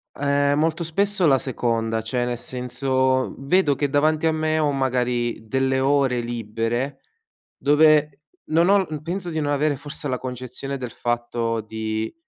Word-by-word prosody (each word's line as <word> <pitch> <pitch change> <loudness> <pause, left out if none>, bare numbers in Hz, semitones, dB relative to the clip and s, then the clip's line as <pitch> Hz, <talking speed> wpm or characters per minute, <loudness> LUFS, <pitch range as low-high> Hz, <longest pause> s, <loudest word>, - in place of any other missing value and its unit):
Ehm, 140 0 +1
molto 160 +2 +1
spesso 195 +2 +1
la 135 -2 +5
seconda 115 -3 -1
cioè, 120 +2 -1
nel 120 -1 -2
senso 130 +1 -1
vedo 145 +1 +2
che 145 -1 -1
davanti 155 +2 +2
a 160 - +4
me 155 0 0
ho 150 -2 +2
magari 125 -4 -1
delle 130 +2 +1
ore 135 -2 +2
libere, 120 +3 -3 0.6
dove 150 -1 +4 0.2
non 165 +3 +3
ho 200 0 +6
l 155 -5 -3
penso 175 +2 -4
di 160 -1 -2
non 145 0 -1
avere 145 +1 +1
forse 145 +1 -7
la 130 -1 -1
concezione 130 +2 -6
del 125 -3 -6
fatto 120 -1 -2
di 110 +1 -4
135 Hz, 155 wpm, -23 LUFS, 120-150 Hz, 0.6 s, ho